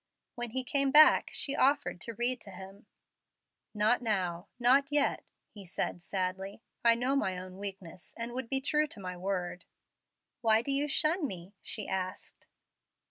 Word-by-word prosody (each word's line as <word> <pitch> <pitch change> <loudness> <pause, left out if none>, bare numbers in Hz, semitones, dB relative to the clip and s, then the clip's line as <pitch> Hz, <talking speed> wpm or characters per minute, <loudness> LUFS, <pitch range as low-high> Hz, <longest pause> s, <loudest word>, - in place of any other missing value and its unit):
When 240 0 -5
he 260 +3 -1
came 275 +2 +1
back 305 +3 +7
she 280 - 0
offered 285 -8 +1
to 230 - -4
read 245 +1 0
to - - -8
him. 195 +3 -12 0.9
"Not 215 +4 +2
now 185 -5 -2
not 265 +4 +3
yet," 290 -1 +2 0.3
he 205 -2 -10
said, 175 -1 -3
sadly. 190 +3 -4 0.2
"I 235 -1 +6
know 250 +4 0
my 190 -9 0
own 185 +1 -9
weakness, 190 -4 -7
and 235 +1 -4
would 255 -2 -5
be 270 -1 +2
true 300 +2 +1
to 225 - -9
my 180 -2 -6
word." 180 -1 -4 0.8
"Why 225 -1 +4
do 275 - -2
you 280 +2 +1
shun 310 +3 +3
me?" 185 -2 -8
she 215 - -3
asked. 185 -1 -5
225 Hz, 165 wpm, -31 LUFS, 190-270 Hz, 0.9 s, back